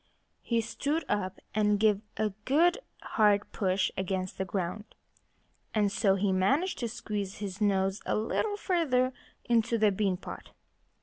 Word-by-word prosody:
He 235 -1 +1
stood 285 +7 -2
up 190 -2 -1
and 210 -1 +2
gave 210 -2 +3 0.2
a 215 -1 +1
good, 340 - +4 0.2
hard 205 -2 +2
push 190 -1 +1
against 190 0 -3
the 190 - 0
ground. 190 +2 -3 0.9
And 205 -2 +3
so 195 -1 +3
he 195 0 +1
managed 270 - +1
to 235 -3 -2
squeeze 205 -3 -4
his 200 0 -6
nose 195 -1 +1
a - - +1
little 410 - -1
further 270 -11 +1 0.3
into 230 -1 +2
the 215 -2 +4
bean 195 -2 0
pot. - - -9
210 Hz, 145 wpm, -30 LUFS, 195-235 Hz, 0.9 s, good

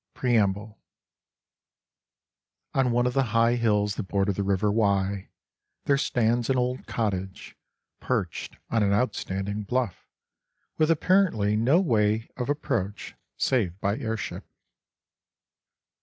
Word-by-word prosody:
I - - -20
Preamble 110 -3 +1 1.9
ON 135 -2 +2
one 120 +1 +2
of 125 - 0
the 135 0 +2
high 115 +1 +4
hills 105 -4 +1
that 100 - -4
border 100 0 +1
the 100 - -2
river 100 +1 +1
Wye, 100 -2 0 0.6
there 140 -1 +3
stands 120 -4 +1
an 135 - +2
old 125 +1 -1
cottage, 95 -4 -3 0.4
perched - - -3
on 115 - +2
an 100 -1 +2
outstanding 100 -2 -1
bluff, 120 -1 -2 0.7
with 155 0 +3
apparently 165 - +3
no 125 +10 +4
way 110 - +1
of 125 +1 -4
approach 105 -8 -2 0.2
save 100 -8 0
by 100 +1 0
airship. 110 -1 -4
110 Hz, 120 wpm, -26 LUFS, 100-125 Hz, 1.9 s, high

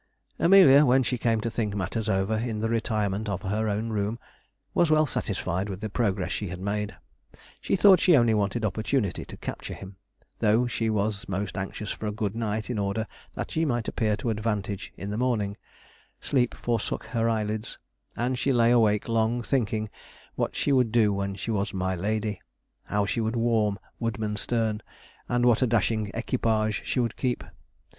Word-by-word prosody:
Amelia, 170 -6 +7
when 130 -1 +4
she 125 0 -1
came 115 -2 +1
to 115 - -1
think 105 -3 -2
matters 105 +3 -2
over 95 +2 +1
in 110 -1 -2
the 115 +1 -1
retirement 110 -2 -1
of 95 -2 -3
her 105 +3 0
own 105 +3 -1
room, 105 +1 -1 0.6
was 170 - +3
well 155 0 +5
satisfied 95 - -2
with 95 -1 -5
the 110 -1 -5
progress 100 -5 0
she 105 - -2
had 90 0 -6
made. 105 +2 -2 0.7
She - - +1
thought 195 -1 +7
she 175 -5 +5
only 120 -3 +4
wanted 105 +2 0
opportunity 110 0 -1
to - - -10
capture - - -6
him. 95 0 -11 0.4
Though 110 +2 +3
she 115 -2 -1
was 105 -2 -1
most 100 +2 -3
anxious 100 +1 -4
for 110 - -4
a - - -1
good 105 -1 -3
night 110 -1 -2
in 120 -4 -2
order 100 +2 -1 0.3
that - - -4
she 160 - 0
might 120 -7 0
appear 110 -3 0
to 115 +2 -1
advantage 105 -2 -2
in 100 +1 -5
the 105 - -2
morning, 110 -6 0 0.6
sleep 125 -3 +1
forsook 115 -3 -2
her 115 -1 0
eyelids, 110 0 -2 0.4
and 125 +1 -1
she 140 - +1
lay 120 -2 +4
awake 110 -4 +3
long 115 +1 +1
thinking 110 -4 0 0.5
what - - -2
she - - +1
would 125 -4 +3
do 110 -3 +4
when 100 0 -2
she 100 +4 -4
was 100 -1 -1
my 95 0 0
lady 105 +2 -2 0.4
how 105 0 0
she 115 +3 -1
would 110 +2 -1
warm 115 -3 +2 0.2
Woodmansterne, 110 -1 -1 0.5
and 120 0 +2
what 120 -1 +4
a 130 - +4
dashing 110 -1 +1
equipage 110 -3 0
she - - 0
would 115 -3 0
keep. 125 -2 -1
110 Hz, 180 wpm, -27 LUFS, 105-120 Hz, 0.7 s, Amelia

